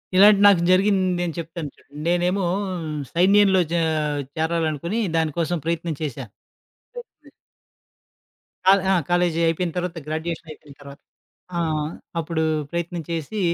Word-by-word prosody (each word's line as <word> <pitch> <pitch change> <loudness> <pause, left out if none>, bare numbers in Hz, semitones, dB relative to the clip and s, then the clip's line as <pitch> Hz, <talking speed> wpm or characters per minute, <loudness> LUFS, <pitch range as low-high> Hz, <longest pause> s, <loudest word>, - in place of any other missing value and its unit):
ఇలాంటివి 205 +1 +7
నాకు 195 -4 +5
జరిగింది 190 0 +3 0.2
నేను 170 -2 -2
చెప్తాను 165 -2 -6
చూడుండి. 145 +1 -14
నేనేమో 180 +2 +1 0.7
సైన్యంలో 190 +2 +5
చే 170 - +1 0.6
చేరాలి 160 0 0
అనుకుని. 170 +10 -3 0.2
దానికోసం 165 +2 0
ప్రయత్నం 165 -1 -2
చేశా. 135 -3 -4 0.7
చేస్తే 480 -1 -12 1.4
క - - -3 0.2
ఆ! - - +5 0.2
కాలేజీ 175 -2 +2
అయిపోయిన 165 +1 0
తర్వాత 180 -1 -3
గ్రాడ్యుయేషనయిపోయిన 155 -2 -6
తర్వాత. 140 0 -12 0.6
ఆహ్, 155 -2 -1 0.3
అప్పుడు 160 0 -2 0.3
ప్రయత్నం 170 0 -3
చేసి, 165 +6 -3
170 Hz, 115 wpm, -23 LUFS, 160-180 Hz, 1.4 s, ఇలాంటివి